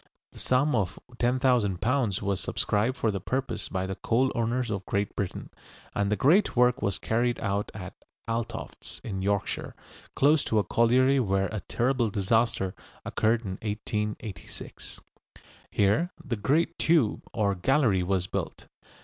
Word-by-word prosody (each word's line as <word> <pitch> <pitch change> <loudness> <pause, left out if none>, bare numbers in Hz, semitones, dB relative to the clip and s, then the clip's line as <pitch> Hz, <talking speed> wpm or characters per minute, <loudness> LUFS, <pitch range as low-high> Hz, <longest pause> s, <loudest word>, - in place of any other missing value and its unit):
The - - -13
sum 135 +4 +2
of 100 -7 0 0.2
£10,000 120 -3 +1
was 100 -1 0
subscribed 110 +6 0
for 110 - +1
the 100 -2 -4
purpose 130 +7 -2
by 95 -1 -2
the 95 - -3
coal 125 +7 +1
owners 120 +1 0
of 100 -2 -2
Great 100 +1 -1
Britain, 100 -3 -4 0.4
and 100 0 0
the - - +3
great 170 - +3
work 125 0 +4
was 100 -1 0
carried 120 +2 0
out 100 0 -1
at 95 -2 -7 0.3
Altofts, 115 -1 -4
in 95 -4 -4
Yorkshire, 100 0 -1 0.4
close 145 +2 +4
to 110 - 0
a 105 - +4
colliery 130 +7 +3
where 95 -4 +1
a 110 - -3
terrible 120 +5 0
disaster 100 -1 +1 0.3
occurred 115 +1 +1
in 95 -3 -5
1886. 105 -1 -5 0.7
Here 105 - +2 0.2
the 130 -5 -1
great 150 +11 +1
tube 160 -10 +3
or 105 -3 +1
gallery 110 0 +2
was 90 0 0
built. - - -4
110 Hz, 145 wpm, -27 LUFS, 100-125 Hz, 0.7 s, work